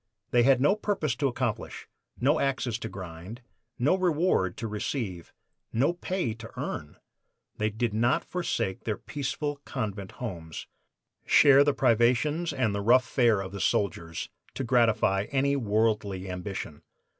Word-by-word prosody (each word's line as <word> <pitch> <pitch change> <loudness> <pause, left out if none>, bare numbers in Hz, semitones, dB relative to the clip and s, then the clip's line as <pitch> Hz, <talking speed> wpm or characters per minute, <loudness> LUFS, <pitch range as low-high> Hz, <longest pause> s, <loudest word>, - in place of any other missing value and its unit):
They 120 - +5
had 130 +1 +5
no 145 +10 +4
purpose 195 - -1
to 140 - +1
accomplish, 125 -3 -3 0.3
no 145 +5 +3
axes 130 -4 -1
to 115 - -5
grind, 95 +5 -9 0.3
no 140 +8 +3
reward 170 - +1
to 115 - -3
receive, 105 - -4 0.4
no 135 +9 +2
pay 180 - -2
to 115 0 -10
earn! 75 - -5 0.6
They 105 0 +1
did 110 +1 -2
not 120 +3 +2
forsake 170 - -2
their 110 -2 -1
peaceful 145 +1 -3
convent 105 -8 -5
homes, 85 -9 -6 0.6
share 140 0 +7
the 145 -1 +1
privations 130 +7 +2
and 125 -7 0
the 100 - -2
rough 125 +5 +5
fare 115 -6 +3
of 95 -1 -6
the 100 -1 -5
soldiers, 85 -4 -1 0.2
to 135 - -2
gratify 115 -5 +2
any 140 +1 +1
worldly 105 -5 0
ambition. 90 -4 -5
115 Hz, 145 wpm, -28 LUFS, 100-140 Hz, 0.6 s, share